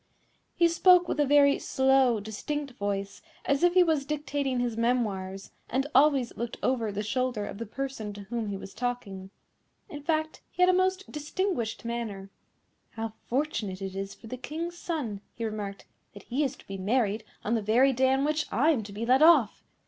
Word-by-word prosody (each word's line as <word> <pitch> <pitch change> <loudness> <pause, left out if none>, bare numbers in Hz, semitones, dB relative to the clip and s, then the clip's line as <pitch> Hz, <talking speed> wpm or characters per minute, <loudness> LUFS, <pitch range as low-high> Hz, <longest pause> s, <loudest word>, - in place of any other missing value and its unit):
He 340 - +5
spoke 355 +1 +5
with - - -2
a 290 - +3
very 280 0 +5
slow, 265 -3 +3
distinct 275 +8 -4
voice, 200 0 -3 0.2
as 280 0 +1
if 350 +1 +4
he 365 - +7
was 315 -5 +1
dictating 285 -3 -2
his 240 -2 -1
memoirs, 205 -5 -1 0.2
and 265 +3 0
always 275 -2 +4
looked 235 0 -4
over 235 -5 +1
the 205 +1 -3
shoulder 245 -1 -1
of 200 - -7
the 230 - -5
person 260 -3 -4
to 205 - -9
whom 225 +2 -3
he 200 -1 -3
was 195 - -10
talking. 215 -6 -4 0.6
In 295 - -7
fact, 315 +1 -1
he 360 - +1
had 360 - +6
a - - 0
most 375 +1 0
distinguished 300 - -2
manner. 215 -5 -4 0.6
"How 225 -1 -4
fortunate 235 -8 -2
it 195 -1 -5
is 195 0 -5
for - - -16
the 255 +3 -6
King's 320 +7 -5
son," 285 - -4
he 230 - -3
remarked, 205 -2 -5 0.3
"that 200 - -11
he 265 +5 -1
is 275 -1 -1
to - - -18
be 195 -1 -7
married 215 +1 +1 0.2
on 225 - -1
the 230 - +1
very 245 +6 +4
day 260 +1 +3
on 270 +1 +2
which 305 +1 0
I 280 +10 +3
am 270 -8 0
to 205 -1 -9
be 210 +3 -4
let 255 +3 +4
off! 310 -9 +5
245 Hz, 195 wpm, -28 LUFS, 210-295 Hz, 0.6 s, he